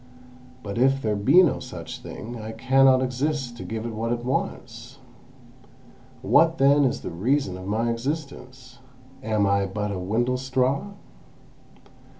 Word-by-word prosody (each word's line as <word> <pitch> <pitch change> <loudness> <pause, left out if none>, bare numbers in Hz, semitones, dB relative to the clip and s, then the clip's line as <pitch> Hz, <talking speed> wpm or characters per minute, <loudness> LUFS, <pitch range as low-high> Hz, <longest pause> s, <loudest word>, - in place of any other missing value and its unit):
But 100 +2 -4
if 135 +2 +3
there 110 -5 -1
be 140 - +5
no 165 - +1
such - - -8
thing, 115 +1 -8
I 110 +1 -7
cannot 130 +3 +4
exist 130 0 -2
to - - -7
give 110 0 -5
it 115 - -4
what 115 +2 -3
it 120 0 -3
wants. 120 -1 -4 1.3
What 165 +4 +4
then 140 0 +4
is 130 - -1
the - - -6
reason 110 - 0
of 95 +1 -8
my 115 +3 0
existence? 130 -1 -6 0.4
Am 110 -4 0
I 100 0 +1
but 105 +1 -3
a 95 - -4
windlestraw?" 125 - -1
120 Hz, 145 wpm, -24 LUFS, 110-135 Hz, 1.3 s, be